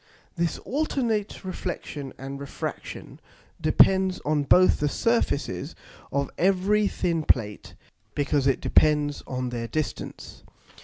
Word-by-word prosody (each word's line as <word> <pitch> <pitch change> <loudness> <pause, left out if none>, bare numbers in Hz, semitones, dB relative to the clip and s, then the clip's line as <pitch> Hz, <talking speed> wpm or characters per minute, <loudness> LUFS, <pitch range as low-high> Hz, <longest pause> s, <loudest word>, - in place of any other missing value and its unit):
This 170 -1 0
alternate 235 -9 -2
Reflexion 155 -6 -5
and 135 +1 -7
Refraction 140 0 -6 0.4
depends 190 +4 +4
on 150 0 +2
both 185 +5 +5
the 145 - +1
Surfaces 230 -7 0 0.4
of 140 0 -1
every 195 +3 +3
thin 170 -4 -1
Plate, 105 -8 0 0.4
because 145 -1 +1
it 135 - +2
depends 150 -1 +3
on 125 -1 -3
their 120 -1 -4
distance. 155 +3 -5
155 Hz, 110 wpm, -26 LUFS, 140-190 Hz, 0.4 s, both